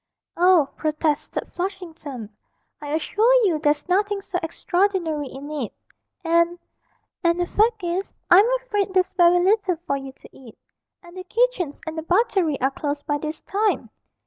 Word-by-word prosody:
'Oh,' 350 -4 +5
protested 305 -1 -2
Flushington, 330 - -6 0.5
'I 295 +1 -3
assure 430 +9 +2
you 335 -6 +1
there's 295 +1 +1
nothing 400 +2 +1
so 360 -2 -3
extraordinary 340 -3 -1
in 275 +3 -9
it, 280 -8 -3 0.5
and 335 +1 +2 0.7
and 340 0 +2
the 350 - +1
fact 435 +2 +1
is, 350 +3 -3
I'm 395 +6 +7
afraid 415 -6 -2
there's 370 -1 +3
very 355 -1 +5
little 390 -2 +2
for 280 - 0
you 270 -1 -8
to - - -17
eat, 245 -5 -14 0.5
and 345 0 -14
the 370 - -7
kitchens 445 - 0
and 315 0 -5
the 320 - -3
buttery 365 - +1
are 265 +2 +2
closed 290 +1 -4
by 290 0 -1
this 310 +1 -6
time.' 415 +2 -1
345 Hz, 155 wpm, -23 LUFS, 300-390 Hz, 0.7 s, I'm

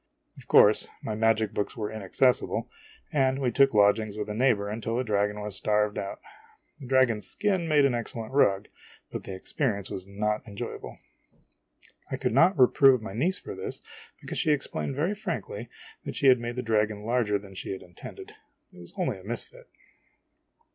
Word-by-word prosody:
Of - - -15
course 105 +1 +5 0.2
my 110 - -3
magic 110 -1 +1
books 105 - -2
\vere 105 -3 -4
inaccessible, 110 +4 +1 0.5
and 135 -2 +2
we 130 -3 0
took 135 +3 +4
lodgings 105 +1 +3
with 105 0 -4
a - - -2
neighbor 110 -3 +2
until 110 +2 -3
the 125 - 0
dragon 105 -2 0
was 105 -1 -5
starved 105 +1 +1
out. 100 - -5 0.6
The 135 - -9
dragon's 125 -5 +2
skin 190 -5 0
made 150 -3 +4
an 135 - +2
excellent 115 0 -4
rug, 100 -8 +3 0.4
but - - -6
the 95 - -6
experience 100 0 -2
was 95 0 -6
not 105 +2 -1
enjoyable. 100 -2 -7 1.1
I - - -3
could - - -1
not 165 +8 +5
reprove 130 0 +6
my 110 -3 -7
niece 170 - +1
for - - -8
this, - - -6 0.4
because - - -5
she 155 - +2
ex 145 -2 +1
plained 135 - -4
very 165 +8 0
frankly 170 - -5 0.4
that - - -5
she - - -2
had 130 -2 +7
made 120 0 -4
the 125 - -3
dragon 105 -2 0
larger 115 -3 +1
than 100 -1 -12
she 95 - -6
intended; 375 - -11 0.4
it - - -14
was - - -11
only - - -1
a - - -15
misfit. - - -6
115 Hz, 180 wpm, -27 LUFS, 105-135 Hz, 1.1 s, had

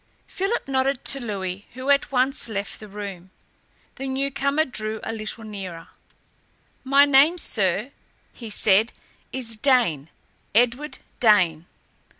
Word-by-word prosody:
Philip 390 0 -2
nodded 270 0 0
to 275 - 0
Louis, 200 -4 -5
who 260 +3 -1
at 280 0 +2
once 260 -1 +1
left 200 -2 -4
the 215 - -10
room. 195 -3 -8 0.7
The 270 0 -5
newcomer 275 +3 0
drew 220 -4 -4
a 225 - -4
little 220 +1 -5
nearer. 190 -6 -8 0.9
"My 275 +2 +5
name, 285 +5 +5
sir," 205 - 0 0.4
he 230 -3 -9
said, 210 +2 +5 0.4
"is 235 -4 -3
Dane 225 - +2 0.5
Edward 245 +5 +1 0.2
Dane." 180 -8 +3
235 Hz, 125 wpm, -23 LUFS, 205-275 Hz, 0.9 s, My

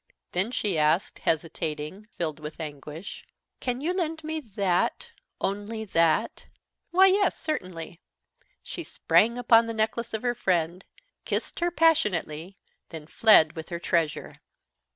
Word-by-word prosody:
Then 190 +5 +1
she 205 -8 0
asked, 155 +6 +1
hesitating, 160 +3 -2
filled 160 -3 -2
with 150 +1 -8
anguish: 150 +3 -7 0.4
"Can 250 0 -2
you 340 +5 0
lend 325 -3 -2
me 315 +1 -3
that, 200 - -1 0.3
only 205 +3 -3
that?" 165 +3 +1 0.4
"Why, 370 +3 +6
yes, 385 0 +3
certainly." 180 - -5 0.6
She - - -6
sprang 235 +2 +2
upon 230 -2 +5
the 230 - -4
neck 220 0 +1
of 225 -1 -4
her 245 -1 +1
friend, 175 -4 0 0.4
kissed - - -3
her 345 0 +1
passionately, 195 - +1 0.3
then 160 -2 -8
fled 165 -3 +5
with 160 -1 -7
her 170 - -3
treasure. 165 -2 -1
195 Hz, 130 wpm, -27 LUFS, 165-240 Hz, 0.6 s, Why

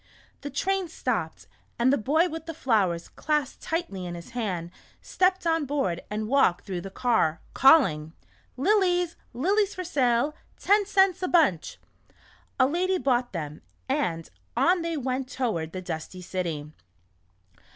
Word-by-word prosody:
The 285 - -5
train 385 +6 -1
stopped, 325 - -3 0.3
and 250 +3 +3
the - - +3
boy 315 +10 +2
with 325 -1 -7
the 330 - -5
flowers 195 - +1
clasped 300 -3 -2
tightly 320 - -3
in 175 - -5
his 170 -1 -10
hand, 185 -8 -3 0.3
stepped 370 0 +1
on 325 -3 +1
board 220 -12 -1
and 215 +1 -3
walked 240 -9 +3
through 185 -3 -4
the 195 - -7
car, 205 -7 +1
calling: 180 - +5 0.2
" - - -36
Lilies, 355 +1 +2 0.2
lilies 395 - +1
for 365 - -4
sale, 270 -4 +1 0.3
ten 410 0 +3
cents 385 -3 +3
a 365 - 0
bunch! 305 - +2 0.4
" - - -31
A 255 - +6
lady 365 +6 +1
bought 250 -6 +1
them, 150 -4 -6 0.3
and 165 -2 -1 0.3
on 360 0 +3
they 335 -1 -2
went 260 -1 -2
toward 195 -13 -2
the 185 +1 -6
dusty 180 +1 -6
city. 170 -5 -4
260 Hz, 150 wpm, -26 LUFS, -, 0.4 s, A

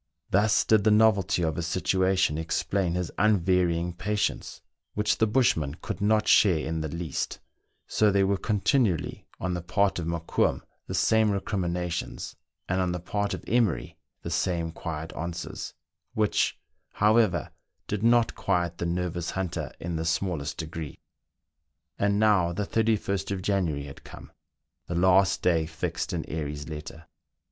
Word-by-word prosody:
Thus 105 +3 +3
did 110 -2 +4
the 110 - +4
novelty 105 -5 +4
of 80 -2 -1
his 85 -1 -2
situation 95 -1 +1
explain 85 +2 -1
his 90 -2 -2
unvarying 90 -4 +2
patience, 105 +3 -2 0.4
which 105 0 +1
the 110 - +4
bushman 110 - +2
could 95 - -6
not 105 +1 +2
share 95 -6 +5
in 80 +1 -2
the 80 - -2
least; 85 +1 -4 0.5
so 105 - +2
there 100 -1 +3
were 100 0 +1
continually 105 - 0
on 90 0 -2
the 90 - -3
part 95 +2 +1
of 80 - -4
Mokoum 85 0 0 0.3
the - - -3
same 110 -1 +3
recriminations, 90 -3 -3 0.3
and 95 +1 0
on 90 -1 0
the 90 - -3
part 100 +3 -2
of - - -10
Emery 105 - +1 0.3
the - - -5
same 85 -3 0
quiet 80 -1 -6
answers, 85 +1 -5 0.4
which, 105 -1 +1 0.4
however, 105 -5 +3 0.3
did 105 -1 -3
not 115 0 +4
quiet 85 -3 -1
the 85 - -1
nervous 85 0 -2
hunter 95 -3 -3
in 85 -1 -3
the 80 - -3
smallest 80 -2 -1
degree. 80 -2 -6 1.0
And 100 0 +2
now 100 -6 +3
the 105 +3 -2
31st 105 -3 0
of 95 -2 -3
January 90 -8 0
had 70 -1 -11
come, - - -12 0.6
the 85 - -3
last 95 +2 +4
day 80 -3 +2
fixed 80 -1 -3
in - - -3
Airy's 75 -2 -4
letter. 80 +1 -8
90 Hz, 150 wpm, -27 LUFS, 85-100 Hz, 1.0 s, share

